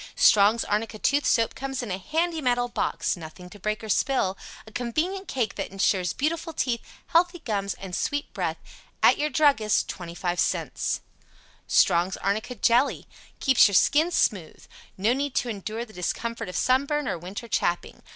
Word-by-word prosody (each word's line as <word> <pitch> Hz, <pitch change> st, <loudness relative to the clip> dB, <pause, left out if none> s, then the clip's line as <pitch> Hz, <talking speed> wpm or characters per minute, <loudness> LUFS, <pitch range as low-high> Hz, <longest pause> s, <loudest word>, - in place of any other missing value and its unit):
Strong's 210 Hz, +3 st, +5 dB
Arnica 215 Hz, +1 st, -1 dB
Tooth 285 Hz, +6 st, +1 dB
Soap 230 Hz, -2 st, +2 dB
comes 270 Hz, -1 st, -4 dB
in 220 Hz, -, -5 dB
a 185 Hz, -, -2 dB
handy 325 Hz, -, -1 dB
metal 245 Hz, -2 st, +1 dB
box 240 Hz, -, -1 dB
nothing 175 Hz, +1 st, -11 dB
to 205 Hz, -, -12 dB
break 215 Hz, +3 st, -2 dB
or -, -, -6 dB
spill. 205 Hz, -4 st, +1 dB, 0.3 s
A 220 Hz, -, -13 dB
convenient 320 Hz, -, -2 dB
cake 230 Hz, -7 st, -1 dB
that -, -, -3 dB
insures 190 Hz, -2 st, +1 dB
beautiful 325 Hz, -, -2 dB
teeth, 245 Hz, -5 st, -1 dB, 0.3 s
healthy, 350 Hz, +1 st, +3 dB
gums 200 Hz, -, -3 dB
and 190 Hz, -2 st, -9 dB
a -, -, 0 dB
sweet 290 Hz, -1 st, -2 dB
breath. -, -, -2 dB, 0.5 s
At -, -, +6 dB
your 300 Hz, +1 st, +1 dB
druggist, 275 Hz, -8 st, +3 dB
25 175 Hz, 0 st, -4 dB
cents. -, -, -1 dB, 0.7 s
Strong's 175 Hz, +2 st, +3 dB
Arnica 215 Hz, +5 st, -2 dB
Jelly 240 Hz, +5 st, +2 dB, 0.3 s
Keeps 265 Hz, -4 st, +6 dB
Your 200 Hz, -, -1 dB
Skin 310 Hz, -, +4 dB
Smooth 195 Hz, -, -1 dB, 0.3 s
No 210 Hz, +5 st, +2 dB
need 280 Hz, +1 st, -2 dB
to 245 Hz, -, 0 dB
endure 220 Hz, +2 st, -4 dB
the 215 Hz, -, -17 dB
discomfort 230 Hz, +4 st, -3 dB
of 180 Hz, -, -7 dB
sunburn 280 Hz, +2 st, +1 dB
or 170 Hz, -, -2 dB
winter 190 Hz, +7 st, -7 dB
chapping. 175 Hz, -5 st, -1 dB
230 Hz, 170 wpm, -26 LUFS, 195-280 Hz, 0.7 s, At